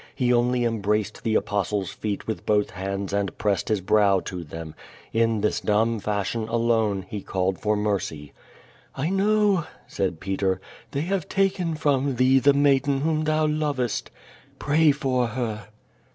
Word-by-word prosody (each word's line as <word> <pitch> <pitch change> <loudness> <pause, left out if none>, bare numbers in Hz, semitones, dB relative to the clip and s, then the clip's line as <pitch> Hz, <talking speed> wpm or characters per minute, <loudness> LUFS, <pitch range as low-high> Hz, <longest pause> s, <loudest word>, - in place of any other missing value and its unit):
He 125 -2 +2
only 120 +1 +2
embraced 105 -2 -1
the 110 -1 0
Apostle's 100 -2 -1
feet 105 -2 -4
with 105 -5 -4
both 105 0 +1
hands 100 0 -4
and 100 -3 -1
pressed 100 -2 0
his 105 -3 +1
brow 100 0 +3
to 90 -2 -6
them. 80 0 -8 0.4
In 115 -1 +2
this 105 - +1
dumb 110 +2 +1
fashion, 105 +2 -2
alone, 115 -4 +1
he 105 +1 -5
called 95 -1 -1
for 105 0 +1
mercy. 95 -8 -2 0.6
"I 150 +6 -1
know,'' 200 -3 +2 0.2
said 95 -5 -2
Peter, 95 0 -1 0.3
"they 140 - -2
have 185 +1 -2
taken 190 -4 +1
from 140 -3 +1
thee 130 +2 +4
the 140 +2 +5
maiden 140 -1 +3
whom 155 0 0
thou 155 0 +2
lovest. 150 -6 -1 0.5
Pray 150 +1 +3
for 130 -4 0
her." 110 -3 -4
115 Hz, 150 wpm, -24 LUFS, 100-140 Hz, 0.6 s, the